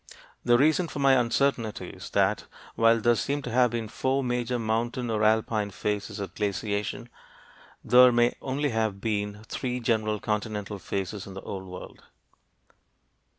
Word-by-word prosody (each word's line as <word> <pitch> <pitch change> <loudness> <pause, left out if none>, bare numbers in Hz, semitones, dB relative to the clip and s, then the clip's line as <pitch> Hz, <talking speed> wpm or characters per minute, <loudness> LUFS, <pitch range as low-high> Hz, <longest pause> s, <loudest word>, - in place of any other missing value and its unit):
The 120 0 +5
reason 155 +6 +3
for 150 - -8
my 135 -1 +4
uncertainty 120 -2 +1
is - - -10
that - - +1 0.3
while 115 0 +4
there 120 +2 +4
seem 140 +5 -2
to 125 - -5
have 125 +1 +4
been 115 -1 -3
four 130 +4 -1
major 125 0 -1
mountain 115 +2 -1
or 110 -1 0
alpine 110 -1 +2
phases 105 +1 -3
of 95 -3 -5
glaciation, 105 +3 -2 0.8
there 125 +1 +7
may 120 0 +3
only 140 +2 -1
have 110 -4 -1
been 105 0 -2
three 125 +3 -3
general 110 -3 0
continental 105 -1 -3
phases 95 +2 -4
in 95 - -9
the 95 - -6
Old 95 -1 -6
World. 90 0 -10
115 Hz, 150 wpm, -27 LUFS, 105-125 Hz, 0.8 s, there